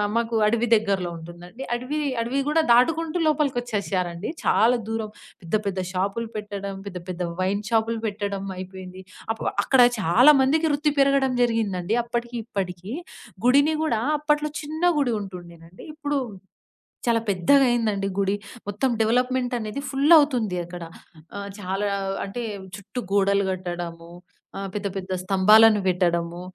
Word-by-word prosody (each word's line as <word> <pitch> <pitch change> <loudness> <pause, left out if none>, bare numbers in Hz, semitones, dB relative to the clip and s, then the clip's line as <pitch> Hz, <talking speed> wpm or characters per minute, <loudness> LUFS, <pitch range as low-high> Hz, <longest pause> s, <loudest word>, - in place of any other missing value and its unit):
మాకు 230 0 0
అడవి 235 +2 +1
దగ్గరలో 195 -5 0
ఉంటుందండి. 175 +8 -10
అడవి, 255 +5 -2 0.2
అడవి 245 +4 -1
గూడా 320 +2 +3
దాటుకుంటూ 320 +7 +3
లోపలికొచ్చేశారండి. 215 - -1
చాలా 240 +3 +4
దూరం. 225 -1 -3 0.3
పెద్ద 170 +4 -2
పెద్ద 195 -1 -2
షాప్లు 200 +5 -2
పెట్టడం 200 -1 -5
పెద్ద 180 -2 -6
పెద్ద 180 0 -3 0.2
వైన్ 195 +2 0
షాపులు 225 0 +1
పెట్టడం 200 -1 -3 0.2
అయిపోయింది. 185 0 -9 0.3
అప్పు - - -8 0.2
అక్కడ 265 -2 +4 0.2
చాలా 190 - -2
చాలా 265 +5 +9
మందికి 290 +5 +3
వృత్తి 295 +1 +1
పెరగడం 275 -1 +3
జరిగిందండి, 220 -5 0
అప్పటికి 240 0 -4
ఇప్పడికి. 190 -3 -5 0.5
గుడిని 285 +5 +4
గూడా 270 -9 +1 0.2
అప్పట్లో 300 0 0
చిన్న 310 0 -7 0.2
గుడి 270 -4 +1
ఉంటుండేనండి. 175 -3 -10
ఇప్పుడు 290 -2 -2 0.9
చాలా 230 -1 +3
పెద్దగయిందండి 215 0 +2
గుడి. 195 0 +1 0.3
మొత్తం 210 +6 0
డెవలప్‌మెంట్ 250 +3 +1
అనేది 215 +4 -4
ఫుల్ 280 +4 +3
అవుతుంది 240 -10 +1
అక్కడ. 175 0 -9 0.5
ఆహ్, 200 0 -5
చాలా 195 +2 -2 0.4
అంటే 200 +5 -5 0.3
చుట్టూ 205 +4 -6
గోడలు 200 0 +3
గట్టడము 175 -2 -6 0.5
ఆహ్, 195 0 -4
పెద్ద 205 -1 -3
పెద్ద 190 0 -6
స్తంభాలను 210 +3 +6
పెట్టడము 175 -1 0
215 Hz, 130 wpm, -24 LUFS, 190-250 Hz, 0.9 s, చాలా